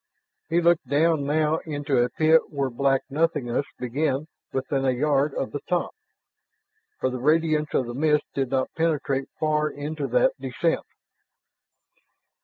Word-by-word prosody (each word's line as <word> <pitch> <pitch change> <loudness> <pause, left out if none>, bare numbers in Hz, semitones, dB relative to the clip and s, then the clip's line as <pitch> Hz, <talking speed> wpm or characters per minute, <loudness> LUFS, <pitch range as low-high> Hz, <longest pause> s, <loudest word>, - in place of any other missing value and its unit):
He 170 +1 +2
looked 170 -5 +3
down 145 +1 +2
now 155 +1 +2
into 145 -4 -1
a 120 - +1
pit 160 +4 +3
where 140 -3 -2
black 135 +2 +1
nothingness 145 -4 0
began 135 +3 -1 0.3
within 135 +1 -1
a 135 - +2
yard 140 +2 +1
of 135 - -2
the 145 - -3
top, 175 -1 0 1.1
for 130 - 0
the 125 - -4
radiance 155 +2 +2
of 130 - +2
the 120 - -6
mist 150 +2 +2
did 135 -2 -1
not 130 0 -1
penetrate 150 -4 0
far 150 -1 +1
into 150 +2 -4
that - - +3
descent. - - -1
145 Hz, 145 wpm, -25 LUFS, 135-155 Hz, 1.1 s, looked